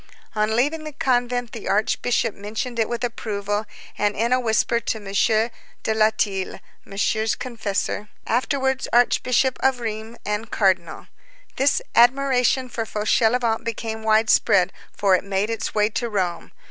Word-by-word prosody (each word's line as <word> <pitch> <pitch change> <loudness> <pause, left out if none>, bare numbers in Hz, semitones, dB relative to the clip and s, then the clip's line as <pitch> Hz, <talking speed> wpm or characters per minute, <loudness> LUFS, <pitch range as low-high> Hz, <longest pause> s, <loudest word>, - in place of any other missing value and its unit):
On 215 0 +1
leaving 295 +6 +1
the 305 -1 -7
convent, 245 -5 0
the 225 - -7
archbishop 215 +2 +1
mentioned 220 +4 -5
it 220 - +1
with 235 +1 -3
approval, 210 -3 -2 0.3
and 210 0 +1
in 235 +3 +1
a 255 - +3
whisper 235 0 +1
to 230 - -2
M. 210 - -12 0.8
de 220 - +1
Latil, 215 -3 0 0.2
Monsieur's 215 +2 0
confessor, 210 -4 -3 0.2
afterwards 265 +2 0
Archbishop 250 +2 +3
of 265 -2 +2
Reims 220 0 -5
and 210 +2 -2
Cardinal. 185 -5 0 0.5
This 275 +1 +2
admiration 255 +1 +3
for 235 -2 -3
Fauchelevent 225 +2 +1
became 225 -1 -4
widespread, 215 -4 +3 0.2
for 195 -2 +2
it - - -1
made 200 +2 -1
its 225 -1 -3
way 210 0 +3
to 235 +2 -3
Rome. 185 -5 -2
225 Hz, 140 wpm, -23 LUFS, 210-245 Hz, 0.8 s, a